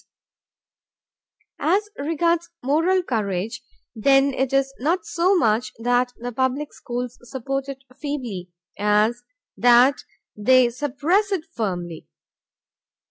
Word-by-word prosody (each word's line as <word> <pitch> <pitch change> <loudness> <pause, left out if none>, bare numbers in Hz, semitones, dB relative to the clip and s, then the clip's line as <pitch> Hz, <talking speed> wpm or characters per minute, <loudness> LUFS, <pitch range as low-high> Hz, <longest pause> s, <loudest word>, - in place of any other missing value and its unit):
As 395 +6 +1
regards 335 +3 0
moral 330 +7 +2
courage, 210 - -2 0.3
then 270 +4 +3
it 260 0 -1
is 270 0 +1
not 325 +6 0
so 360 +4 +2
much 220 -5 +1
that 245 +2 +1
the 245 +1 -5
public 260 +4 -1
schools 245 0 -5
support 270 +1 -3
it 270 -1 -8 0.2
feebly, 245 - -4 0.3
as 210 +3 +2 0.3
that 245 +2 +5 0.3
they 245 +3 +4
suppress 295 - 0
it 360 -5 -1
firmly. 175 -7 -4
260 Hz, 105 wpm, -23 LUFS, 230-295 Hz, 0.3 s, that